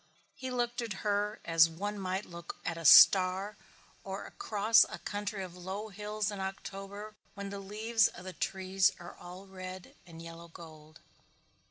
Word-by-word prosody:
He 260 Hz, 0 st, -6 dB
looked 240 Hz, -1 st, -1 dB
at 230 Hz, -3 st, -3 dB
her 205 Hz, 0 st, 0 dB
as 165 Hz, -1 st, +5 dB
one 205 Hz, +5 st, -4 dB
might 190 Hz, +1 st, -2 dB
look 170 Hz, 0 st, -8 dB
at 170 Hz, -, -1 dB
a 165 Hz, -1 st, -7 dB
star 190 Hz, +5 st, +7 dB, 0.5 s
or -, -, -5 dB
across 220 Hz, -, +3 dB
a -, -, -6 dB
country 205 Hz, -1 st, -4 dB
of 180 Hz, -1 st, -9 dB
low 190 Hz, +4 st, -6 dB
hills 210 Hz, +1 st, -3 dB
in 205 Hz, -, -6 dB
October 195 Hz, +2 st, -6 dB, 0.2 s
when 200 Hz, -1 st, -6 dB
the 200 Hz, -, -5 dB
leaves 215 Hz, +3 st, +2 dB
of 175 Hz, -, -10 dB
the 185 Hz, -, -6 dB
trees 190 Hz, 0 st, +1 dB
are 175 Hz, 0 st, -9 dB
all 180 Hz, +2 st, -11 dB
red 185 Hz, -1 st, -9 dB
and 165 Hz, -1 st, -11 dB
yellow 165 Hz, 0 st, -10 dB
gold. 155 Hz, -1 st, -14 dB
195 Hz, 165 wpm, -31 LUFS, 180-210 Hz, 0.5 s, star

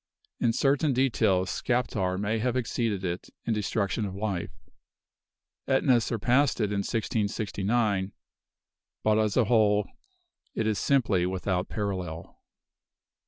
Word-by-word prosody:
In 115 Hz, -, +2 dB
certain 140 Hz, +4 st, +2 dB
details, 100 Hz, -8 st, +2 dB
Skaptar 100 Hz, -7 st, -1 dB
may 105 Hz, +2 st, -1 dB
have 125 Hz, +2 st, 0 dB
exceeded 115 Hz, -5 st, -1 dB
it: 90 Hz, 0 st, -4 dB, 0.2 s
in 115 Hz, -, +1 dB
destruction 105 Hz, 0 st, -1 dB
of 95 Hz, -2 st, -4 dB
life. 100 Hz, -3 st, -2 dB, 1.2 s
Ætna 130 Hz, -2 st, +3 dB
surpassed 120 Hz, +6 st, +1 dB
it 105 Hz, -2 st, 0 dB
in 100 Hz, -, 0 dB
1669; 105 Hz, -1 st, -1 dB, 0.9 s
but 110 Hz, 0 st, +3 dB
as 105 Hz, -2 st, +1 dB
a 125 Hz, -, +5 dB
whole, 105 Hz, -2 st, +3 dB, 0.7 s
it 110 Hz, -, 0 dB
is 110 Hz, -2 st, 0 dB
simply 110 Hz, -10 st, +2 dB
without 95 Hz, 0 st, -1 dB
a -, -, -11 dB
parallel. 90 Hz, -6 st, -4 dB
105 Hz, 120 wpm, -27 LUFS, 95-120 Hz, 1.2 s, a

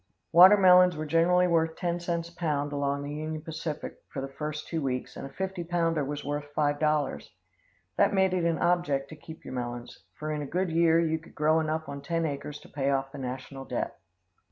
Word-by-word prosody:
Watermelons 180 Hz, -1 st, +7 dB
were 155 Hz, -, -3 dB
generally 170 Hz, +3 st, +3 dB
worth 165 Hz, -1 st, +1 dB
ten 175 Hz, -1 st, -2 dB
cents 170 Hz, -1 st, -2 dB
a 170 Hz, -, -17 dB
pound 145 Hz, -4 st, -1 dB
along 140 Hz, 0 st, -1 dB
the 145 Hz, +1 st, -5 dB
Union 155 Hz, +1 st, -4 dB
Pacific 160 Hz, -1 st, -5 dB
for -, -, -6 dB
the 135 Hz, -, -3 dB
first 150 Hz, +2 st, -5 dB
two 165 Hz, -2 st, -2 dB
weeks, 130 Hz, -2 st, -3 dB
and -, -, -6 dB
a -, -, -15 dB
fifty 190 Hz, -1 st, -3 dB
pounder 165 Hz, -2 st, 0 dB
was 145 Hz, +1 st, -5 dB
worth 145 Hz, 0 st, -4 dB
$5. 150 Hz, -1 st, 0 dB, 0.7 s
That -, -, +4 dB
made 190 Hz, -2 st, +2 dB
it 180 Hz, -2 st, 0 dB
an 165 Hz, -1 st, +1 dB
object 145 Hz, -6 st, +1 dB
to 155 Hz, -, -9 dB
keep 160 Hz, +1 st, -12 dB
your -, -, -7 dB
melons, 120 Hz, -1 st, -5 dB, 0.2 s
for 155 Hz, 0 st, -4 dB
in 150 Hz, -1 st, -2 dB
a 145 Hz, -, -5 dB
good 180 Hz, +3 st, -1 dB
year 165 Hz, 0 st, +4 dB
you 160 Hz, -1 st, +1 dB
could 165 Hz, -, -18 dB
grow 155 Hz, +1 st, +3 dB
enough 160 Hz, 0 st, -2 dB
on 140 Hz, 0 st, -6 dB
ten 165 Hz, +3 st, -1 dB
acres 145 Hz, 0 st, -4 dB
to -, -, -14 dB
pay 140 Hz, -1 st, -2 dB
off 135 Hz, -1 st, 0 dB
the 145 Hz, -, -8 dB
national 130 Hz, +1 st, -6 dB
debt. -, -, -4 dB
155 Hz, 210 wpm, -28 LUFS, 145-170 Hz, 0.7 s, Watermelons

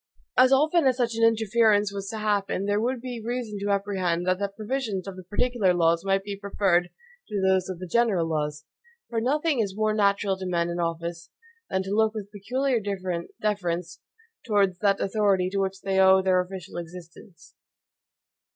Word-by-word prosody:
As 255 Hz, +1 st, +6 dB
often 310 Hz, +3 st, +4 dB
as 255 Hz, -1 st, +2 dB
such 240 Hz, -2 st, 0 dB
an 230 Hz, 0 st, -1 dB
interference 220 Hz, -2 st, +3 dB
was 200 Hz, 0 st, -5 dB
to 220 Hz, -, -5 dB
happen, 200 Hz, -2 st, -1 dB
there 205 Hz, +1 st, +1 dB
would 245 Hz, +1 st, -1 dB
be 245 Hz, -2 st, -6 dB
reason 235 Hz, -3 st, -4 dB
to 200 Hz, +1 st, -3 dB
apprehend 190 Hz, -4 st, 0 dB
that 185 Hz, 0 st, +1 dB
the 200 Hz, -, 0 dB
provisions 215 Hz, -1 st, -4 dB
of 195 Hz, -, -6 dB
the 185 Hz, -, -9 dB
particular 205 Hz, 0 st, +1 dB
laws 170 Hz, 0 st, +2 dB
might 195 Hz, 0 st, +1 dB
be 200 Hz, 0 st, -5 dB
preferred 195 Hz, -3 st, +1 dB, 0.4 s
to 205 Hz, -, -2 dB
those 190 Hz, -1 st, +2 dB
of 185 Hz, -, -4 dB
the 185 Hz, -, -7 dB
general 200 Hz, -3 st, +2 dB
laws; 150 Hz, -1 st, -3 dB, 0.5 s
for 225 Hz, -1 st, 0 dB
nothing 295 Hz, +3 st, +1 dB
is 200 Hz, -3 st, -1 dB
more 215 Hz, 0 st, +1 dB
natural 200 Hz, -2 st, +1 dB
to 190 Hz, -1 st, -5 dB
men 170 Hz, -1 st, 0 dB
in 170 Hz, -, -4 dB
office 170 Hz, 0 st, -3 dB, 0.4 s
than 190 Hz, -, 0 dB
to 190 Hz, -, -6 dB
look 220 Hz, +1 st, +2 dB
with 205 Hz, -2 st, -6 dB
peculiar 250 Hz, +5 st, -1 dB, 0.6 s
deference 180 Hz, -5 st, -2 dB, 0.4 s
towards 200 Hz, -5 st, +1 dB
that 200 Hz, -2 st, +2 dB
authority 195 Hz, -2 st, +1 dB
to 200 Hz, -, -1 dB
which 195 Hz, 0 st, -2 dB
they 195 Hz, -1 st, 0 dB
owe 190 Hz, 0 st, +7 dB
their 185 Hz, -1 st, +3 dB
official 180 Hz, -1 st, -8 dB
existence. 170 Hz, 0 st, -11 dB
200 Hz, 180 wpm, -26 LUFS, 185-220 Hz, 0.6 s, owe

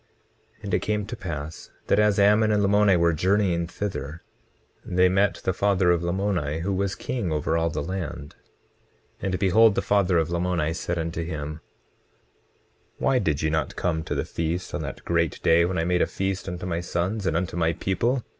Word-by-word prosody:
20:8 -, -, -27 dB
And -, -, -4 dB
it -, -, +3 dB
came 105 Hz, -1 st, -1 dB
to 120 Hz, -, -6 dB
pass 80 Hz, -6 st, -6 dB, 0.2 s
that 100 Hz, -, +2 dB
as 105 Hz, -1 st, +3 dB
Ammon 105 Hz, +2 st, +4 dB
and 105 Hz, -1 st, +2 dB
Lamoni 100 Hz, -1 st, +4 dB
were 85 Hz, 0 st, +3 dB
journeying 90 Hz, 0 st, +1 dB
thither, 85 Hz, -5 st, -5 dB, 0.6 s
they 90 Hz, +1 st, +3 dB
met 95 Hz, +2 st, +2 dB
the 95 Hz, -, 0 dB
father 95 Hz, -2 st, +2 dB
of 85 Hz, -1 st, +2 dB
Lamoni, 85 Hz, -4 st, -1 dB
who 95 Hz, +3 st, -1 dB
was 95 Hz, 0 st, -1 dB
king 120 Hz, -9 st, -3 dB
over 75 Hz, +1 st, 0 dB
all 85 Hz, 0 st, +1 dB
the 75 Hz, -, -3 dB
land. 85 Hz, -4 st, -5 dB, 0.9 s
20:9 95 Hz, -, -2 dB
And 90 Hz, -, -1 dB
behold, 105 Hz, +2 st, +4 dB
the -, -, 0 dB
father 95 Hz, -3 st, +2 dB
of 80 Hz, 0 st, 0 dB
Lamoni 85 Hz, -2 st, 0 dB
said 85 Hz, 0 st, -3 dB
unto 85 Hz, 0 st, -3 dB
him: 75 Hz, -2 st, -5 dB, 1.4 s
Why 135 Hz, -2 st, +2 dB
did 80 Hz, -8 st, -1 dB
ye 80 Hz, -, +1 dB
not 80 Hz, 0 st, -1 dB
come 80 Hz, -3 st, -1 dB
to -, -, -3 dB
the -, -, -1 dB
feast 85 Hz, +2 st, -3 dB
on -, -, -2 dB
that -, -, -7 dB
great 85 Hz, -2 st, 0 dB
day 85 Hz, +1 st, +5 dB
when 90 Hz, +1 st, -2 dB
I 80 Hz, -, +1 dB
made 90 Hz, 0 st, +1 dB
a -, -, +3 dB
feast 95 Hz, 0 st, -3 dB
unto 90 Hz, 0 st, -5 dB
my 85 Hz, -2 st, -2 dB
sons, 95 Hz, +4 st, -2 dB
and 80 Hz, -, +1 dB
unto 90 Hz, -1 st, -3 dB
my 80 Hz, -1 st, +1 dB
people? 120 Hz, +9 st, -1 dB
90 Hz, 200 wpm, -25 LUFS, 85-100 Hz, 1.4 s, day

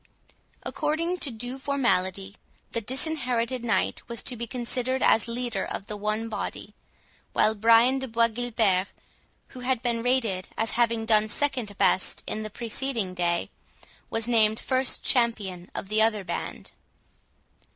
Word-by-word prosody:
According 335 Hz, +4 st, -1 dB
to 315 Hz, -, 0 dB
due 245 Hz, +3 st, -5 dB
formality, 200 Hz, -8 st, 0 dB, 0.4 s
the 230 Hz, -, -1 dB
Disinherited 255 Hz, -2 st, -1 dB
Knight 230 Hz, -, +1 dB
was 235 Hz, -1 st, -1 dB
to 255 Hz, -, 0 dB
be 235 Hz, 0 st, -5 dB
considered 250 Hz, +2 st, -1 dB
as 220 Hz, +1 st, +4 dB
leader 235 Hz, -3 st, -2 dB
of 195 Hz, -, -5 dB
the 210 Hz, -, -5 dB
one 215 Hz, +2 st, -2 dB
body, 220 Hz, -, -5 dB, 0.6 s
while 215 Hz, -, +4 dB
Brian 230 Hz, +5 st, +5 dB
de 265 Hz, -, -3 dB
Bois 230 Hz, 0 st, +3 dB
Guilbert, 220 Hz, -5 st, +1 dB, 0.6 s
who 255 Hz, -, -10 dB
had 250 Hz, -1 st, -1 dB
been 235 Hz, -2 st, 0 dB
rated 230 Hz, -7 st, 0 dB
as 225 Hz, 0 st, 0 dB
having 230 Hz, -1 st, +1 dB
done 215 Hz, -1 st, +4 dB
second 245 Hz, -5 st, -1 dB
best 190 Hz, -1 st, +2 dB
in 215 Hz, -, -3 dB
the 215 Hz, -, -5 dB
preceding 230 Hz, -2 st, -2 dB
day, 175 Hz, -1 st, 0 dB, 0.6 s
was 225 Hz, 0 st, -1 dB
named 220 Hz, -2 st, +3 dB
first 260 Hz, -1 st, 0 dB
champion 205 Hz, -8 st, +1 dB
of -, -, -4 dB
the 215 Hz, +2 st, +2 dB
other 215 Hz, -2 st, +2 dB
band. 175 Hz, -, -5 dB
230 Hz, 145 wpm, -27 LUFS, 215-250 Hz, 0.6 s, Brian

